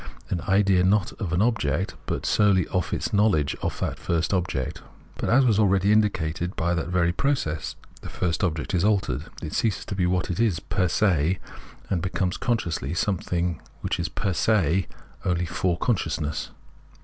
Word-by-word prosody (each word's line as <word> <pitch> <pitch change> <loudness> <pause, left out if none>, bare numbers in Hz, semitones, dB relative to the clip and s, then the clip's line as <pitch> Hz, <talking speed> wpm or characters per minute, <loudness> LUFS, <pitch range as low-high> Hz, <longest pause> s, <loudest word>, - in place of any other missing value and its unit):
an 85 - 0
idea 95 -2 +4
not 95 0 +2
of 90 -5 -2
an 90 +4 +2
object, 95 - 0
but - - -2
solely 100 -3 +3
of 90 -3 -1
its - - -2
knowledge 100 -9 +3
of - - -3
that - - -2
first 85 +2 0
object. 85 -8 -1 0.4
But, - - -1
as 130 +3 +5
was 110 -4 +3
already 100 -1 +3
indicated, 90 -4 +1
by 85 +2 0
that 85 -1 -2
very 85 -1 +1
process 130 - -1 0.3
the - - -8
first 85 -4 -1
object 80 -3 -1
is 90 -1 +2
altered; 105 -2 +1 0.2
it 75 - -5
ceases 110 -3 0
to - - -4
be 90 -2 +1
what 90 0 0
'is 110 -9 +2
fer 90 -1 +2
se, 90 -1 +2 0.5
and 90 -3 0
becomes 95 0 -1
consciously 85 - -1
something 90 -3 -1 0.2
which - - -2
is - - 0
fer 95 - -2
se 95 -3 +2 0.4
only 90 -2 0
for 85 +1 0
consciousness. 80 - -1
90 Hz, 170 wpm, -25 LUFS, 85-100 Hz, 0.5 s, as